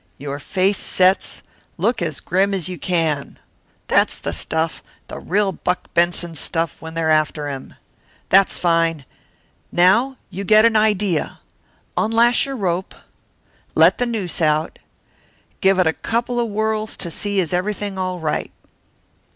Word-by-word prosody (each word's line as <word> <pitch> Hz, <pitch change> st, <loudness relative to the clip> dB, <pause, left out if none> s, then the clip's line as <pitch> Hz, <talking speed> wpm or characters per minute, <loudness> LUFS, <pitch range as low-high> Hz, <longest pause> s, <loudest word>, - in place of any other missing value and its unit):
Your 140 Hz, +1 st, -5 dB
face 190 Hz, +6 st, 0 dB
sets 185 Hz, +1 st, +2 dB, 0.3 s
look 235 Hz, -3 st, 0 dB
as 155 Hz, -5 st, -3 dB
grim 195 Hz, +3 st, +1 dB
as 180 Hz, -5 st, -3 dB
you 180 Hz, -2 st, -6 dB
can. 160 Hz, -5 st, -1 dB, 0.5 s
That's -, -, +2 dB
the -, -, -4 dB
stuff 160 Hz, 0 st, -2 dB, 0.3 s
the -, -, -7 dB
real 200 Hz, +1 st, 0 dB
Buck 180 Hz, +1 st, -3 dB
Benson 175 Hz, 0 st, +1 dB
stuff 165 Hz, +1 st, -2 dB
when 160 Hz, 0 st, -8 dB
they're 160 Hz, -1 st, +1 dB
after 155 Hz, -1 st, +1 dB
him. 135 Hz, -2 st, -7 dB, 0.5 s
That's 195 Hz, 0 st, +4 dB
fine. 165 Hz, -4 st, +1 dB, 0.7 s
Now 230 Hz, +10 st, +3 dB
you 195 Hz, -, -5 dB
get 215 Hz, +2 st, +5 dB
an 230 Hz, -1 st, +3 dB
idea. 210 Hz, -6 st, +1 dB, 0.6 s
Unlash 230 Hz, +4 st, +3 dB
your 275 Hz, -, -4 dB
rope, 185 Hz, -3 st, -2 dB, 0.8 s
let -, -, +5 dB
the 245 Hz, -, +1 dB
noose 205 Hz, -8 st, -3 dB
out, 155 Hz, +1 st, +1 dB, 0.8 s
give 190 Hz, 0 st, +4 dB
it 185 Hz, -, +3 dB
a 160 Hz, -, +2 dB
couple 240 Hz, +5 st, -2 dB
of 235 Hz, -1 st, 0 dB
whirls 215 Hz, +1 st, -1 dB
to 170 Hz, -, -2 dB
see 205 Hz, +3 st, 0 dB
is 180 Hz, -2 st, -1 dB
everything 200 Hz, +1 st, -2 dB
all 185 Hz, -1 st, -2 dB
right. 155 Hz, -2 st, -2 dB
185 Hz, 145 wpm, -20 LUFS, 165-210 Hz, 0.8 s, get